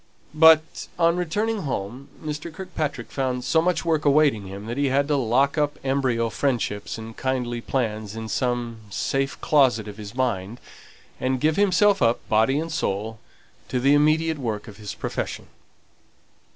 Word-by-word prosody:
But, 160 0 +5
on 170 0 +3
returning 205 +6 -1
home, 125 -1 -5
Mr. 155 +2 -5
Kirkpatrick 155 -8 -4
found 130 -2 -2
so 160 +5 +3
much 180 0 0
work 160 -2 +1
awaiting 140 -8 +3
him 100 +2 -8
that 120 +3 -5
he 140 0 +2
had 140 +2 +2
to 150 - +3
lock 135 +3 +2
up 145 -1 0
embryo 130 -4 0
friendships 115 -8 -2
and 110 0 -9
kindly 125 -3 -2
plans 110 -5 -2
in 110 0 -5
some 120 -1 -1
safe 135 +6 -2
closet 130 -8 +3
of 105 0 -8
his 105 +1 -9
mind, 120 -3 -2 0.6
and 130 0 0
give 155 +3 +2
himself 200 0 +3
up, 115 0 +1
body 110 +6 +3
and 165 +2 -3
soul, 110 -6 -2 0.5
to 125 - -1
the 135 +3 +4
immediate 155 +2 +3
work 110 -4 -3
of 105 -2 -11
his 105 -1 -7
profession. - - -4
130 Hz, 160 wpm, -24 LUFS, 115-155 Hz, 0.6 s, But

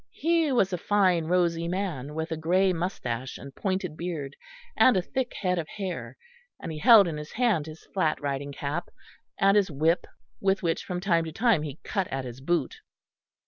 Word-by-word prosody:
He 330 -1 +2
was 195 -7 +2
a 180 - -1
fine 185 -4 +2
rosy 170 -1 +1
man, 170 -7 -3
with 160 +1 -2
grey 185 +3 +3
moustache 130 -8 -3
and 140 +1 -10
pointed 185 -4 -2
beard, 155 -5 -5 0.4
and 255 - +5
a - - +2
thick 260 +5 -2
head 180 -2 +1
of 160 - -4
hair, 190 -2 -5 0.4
and - - -6
he 155 - -6
held 225 -1 +8
in 160 -3 -3
his 150 0 -8
hand 220 -11 +1
his 155 0 -11
flat 170 -6 +1
riding 140 0 -3
cap, 145 +4 -4 0.5
and 195 +1 +4
his 205 -2 +3
whip 160 +4 +1 0.3
with 195 -1 +1
which 165 -1 -1
from 180 -1 -3
time 170 -4 +2
to 160 - -5
time 215 -1 +2
he 150 -2 -6
cut 195 -2 -1
at 135 -1 -4
his 125 +1 -8
boot. 160 -1 0
175 Hz, 185 wpm, -27 LUFS, 150-195 Hz, 0.5 s, held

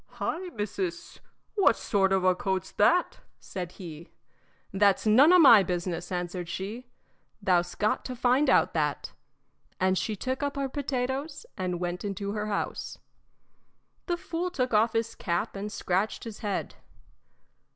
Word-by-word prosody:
"Hi, 360 +2 -3
missis; 195 -5 -4 0.3
what 395 - +4
sort 195 -2 +1
of 190 -1 +2
a 185 0 +5
coat's 190 0 -2
that?" 350 +13 +2 0.2
said 180 -2 -6
he. 170 -3 -10 0.6
"That's 200 +1 +3
none 255 +10 +6
o' 365 - +8
my 265 - +9
business," 175 0 -3
answered 175 -1 -3
she, 205 +8 -5 0.5
"Thou 185 -4 +3
'st 175 0 -10
got 215 - +1
to 255 - -5
find 255 +4 +2
out - - +4
that." - - -1 0.7
And 185 0 +2
she 215 - -2
took 260 +7 -3
up 285 0 -2
her 275 -1 -2
potatoes 275 +2 -3
and 180 -2 -3
went 175 0 -3
into 200 0 -3
her 210 0 -3
house. 205 - -3 1.1
The 350 -1 0
fool 345 +1 -3
took 255 -9 -2
off 220 +2 +3
his 225 0 -1
cap 175 +4 -2
and 205 +2 -5
scratched 190 +2 -1
his 225 -3 -8
head. 205 -3 -3
205 Hz, 150 wpm, -28 LUFS, 185-255 Hz, 1.1 s, my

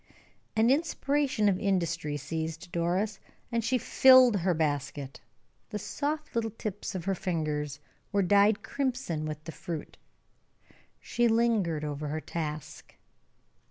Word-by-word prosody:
An 225 +3 +4
inspiration 280 -6 +1
of 190 -2 +2
industry 170 -6 0
seized 160 +4 -5
Doris, 185 +5 0 0.3
and 230 -1 0
she 250 +3 +2
filled 255 -1 +6
her 180 -1 +1
basket; 145 -3 -2 0.5
the 210 - -3
soft 300 +8 -3
little 225 -1 +1
tips 210 -2 -5
of 175 -3 -4
her 195 - +1
fingers 150 -5 -2 0.3
were 200 -1 +2
dyed 205 +3 +4
crimson 255 - -2
with 155 0 -6
the 165 - -7
fruit. 170 -2 -6 1.0
She 240 0 +1
lingered 220 -9 +2
over 150 0 -4
her 155 +2 -2
task. 155 -2 -6
190 Hz, 125 wpm, -29 LUFS, 155-230 Hz, 1.0 s, filled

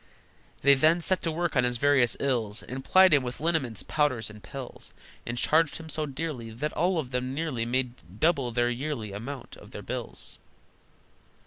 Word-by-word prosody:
They 140 +1 +8
then 155 +5 +4
set 185 +2 0
to 165 - -1
work 170 0 -1
on 130 - +4
his 125 0 0
various 135 -2 +3
ills, 115 -6 0
And 130 +1 -6
plied 185 +1 +6
him 145 - +6
with 125 -1 -5
liniments, 135 - 0
powders, 130 -8 0
and 105 0 -13
pills, 135 +2 -8 0.3
And 120 +1 -3
charged 160 +3 +3
him 160 -1 -10
so 155 0 -2
dearly 140 -5 -4
That 135 +7 -4
all 180 +3 +1
of 135 -6 -3
them 130 +1 -2
nearly 140 -7 -2
Made 120 -6 -3
double 140 -7 +2
the 120 +1 +1
yearly 125 -5 -4
amount 120 +6 -7
of - - -14
their - - -8
bills. - - -5
135 Hz, 185 wpm, -28 LUFS, 120-155 Hz, 0.3 s, They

